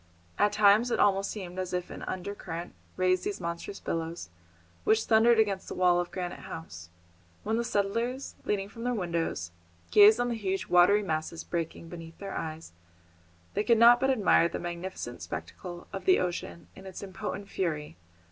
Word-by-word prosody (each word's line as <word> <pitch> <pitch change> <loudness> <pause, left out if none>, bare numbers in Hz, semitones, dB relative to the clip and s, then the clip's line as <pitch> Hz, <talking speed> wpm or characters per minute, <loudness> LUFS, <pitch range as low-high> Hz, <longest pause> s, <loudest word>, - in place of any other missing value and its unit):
At 205 - +4
times 210 +3 +5
it - - 0
almost 195 -1 +3
seemed 185 -3 -6
as 185 -1 -3
if 180 0 -3
an - - -8
under 185 +2 -4
current 170 -3 -7 0.2
raised 185 0 +2
these 205 - -3
monstrous 170 +4 -5
billows 165 - -4 0.5
which 220 0 +3
thundered 230 +1 +5
against 200 -4 +1
the - - -6
wall 180 -1 +4
of 175 0 -2
Granite 180 -2 -5
House. 90 - -9 0.5
When 220 +2 0
the 235 - 0
settlers, 230 +5 -1
leaning 200 -1 -1
from 230 +3 -10
their 245 0 0
windows, 170 - -2 0.4
gazed 210 +2 +8
on 245 0 +1
the - - 0
huge 195 -3 -2
watery 185 +4 +5
masses 160 -1 -3
breaking 165 -1 -4
beneath 165 -1 -10
their 195 -1 -6
eyes, 160 0 -5 0.8
they 205 - 0
could 235 +1 +4
not 235 +2 +8
but 265 +1 +2
admire 205 -8 +4
the - - -4
magnificent 175 -7 -6
spectacle 90 - -7
of 195 - -5
the 370 - +6
ocean 175 -1 -3
in 190 - -11
its 190 +1 -8
impotent 195 +1 -5
fury. 155 -7 -3
190 Hz, 175 wpm, -29 LUFS, 170-210 Hz, 0.8 s, gazed